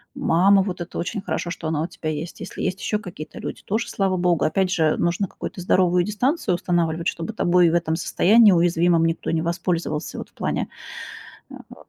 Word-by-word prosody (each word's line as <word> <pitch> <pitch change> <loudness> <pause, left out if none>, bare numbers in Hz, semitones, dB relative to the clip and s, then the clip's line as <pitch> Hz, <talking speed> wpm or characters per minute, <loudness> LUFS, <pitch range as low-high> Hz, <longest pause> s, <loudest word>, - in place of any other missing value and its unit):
Мама, 195 +4 +4
вот 185 -2 -4
это 175 - -6
очень 200 +3 -3
хорошо, 175 - -3
что 165 -2 -5
она 155 -1 -1
у 165 - -1
тебя 160 -2 -6
есть. 155 +2 -5
Если - - -7
есть 185 +1 -2
ещё 210 - -1
какие-то 175 -7 -9
люди, - - -6
тоже 215 +3 -1
слава 195 -2 0
богу. 175 -2 +1
Опять 185 +3 +1
же, 165 - +1
э, 155 - +2
нужно 175 +3 0
какую-то 180 - -7
здоровую 180 0 +3
дистанцию 215 - 0
устанавливать, 170 -2 -1
чтобы 165 +6 -3
тобой 180 -4 +3
в 165 - -1
этом 165 -2 0
состоянии 210 +5 +5
уязвимом 170 -1 +3
никто 165 0 -1
не 160 - 0
воспользовался 170 -2 -2
вот - - -7
в - - -36
плане, - - -2 0.8
э, - - -10
э, - - -12
175 Hz, 200 wpm, -23 LUFS, 165-190 Hz, 0.8 s, состоянии